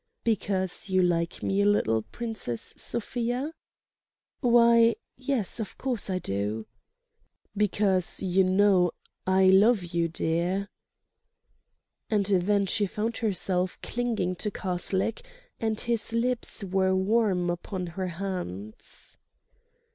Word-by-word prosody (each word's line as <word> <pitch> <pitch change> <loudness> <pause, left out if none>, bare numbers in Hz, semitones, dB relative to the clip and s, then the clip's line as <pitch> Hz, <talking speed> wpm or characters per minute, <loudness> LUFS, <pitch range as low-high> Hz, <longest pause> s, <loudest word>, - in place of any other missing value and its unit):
"Because 195 -4 -1
you 185 -1 +3
like 170 -1 0
me 195 +1 +1
a - - +3
little, 115 - +2
Princess 220 - -5
Sofia?" 245 +6 -3 0.9
"Why—yes—of 235 -1 +2
course 250 -6 -2
I 185 - 0
do—" 105 - -3 0.9
"Because 195 -3 +1
you 190 0 +2
know 185 -2 +4 0.3
I 190 0 +4
love 195 +3 +5
you, 170 -1 +2
dear." 175 +5 -1 1.4
And 210 -3 +2
then 200 +1 +2
she 205 +2 +1
found 220 +4 -3
herself 185 -4 -1
clinging 225 -7 -1
to 210 - -2
Karslake; 190 - -1 0.4
and 220 -1 -1
his 230 -2 -2
lips 235 -2 -1
were 190 0 +1
warm 190 -3 +2
upon 180 +2 -4
her 185 +2 -4
hands 170 - -7
195 Hz, 105 wpm, -27 LUFS, 180-225 Hz, 1.4 s, love